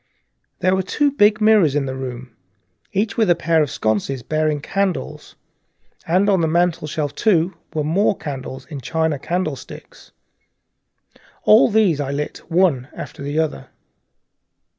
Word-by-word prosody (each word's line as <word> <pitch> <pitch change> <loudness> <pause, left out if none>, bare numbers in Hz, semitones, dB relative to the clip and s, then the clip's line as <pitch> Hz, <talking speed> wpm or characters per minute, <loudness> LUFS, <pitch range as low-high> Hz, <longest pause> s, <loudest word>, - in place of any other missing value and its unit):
There 185 - +3
were 190 - +1
two 285 +10 0
big 210 -5 +3
mirrors 210 -9 +4
in 145 -2 +1
the 130 - -4
room, 125 -2 -7 0.6
each 205 +2 -1
with 220 -4 +2
a 175 - +5
pair 165 -1 +2
of 150 - 0
sconces 110 +4 -1
bearing 155 0 0
candles, 195 +4 -3 0.7
and 185 +5 +2
on 195 -4 +3
the 160 - +2
mantelshelf, 160 -3 0
too, 185 -4 +2 0.2
were 160 +7 +1
candles 130 -4 -7
in 145 -5 -8
china 160 0 -1
candle 170 -1 -2
sticks. - - -13 1.3
All 105 +6 +6
these 200 -8 +2
I 135 - -3
lit 145 +1 -4
one 165 -8 +2
after - - -8
the 145 +2 -3
other. 155 - -2
160 Hz, 140 wpm, -20 LUFS, 140-190 Hz, 1.3 s, All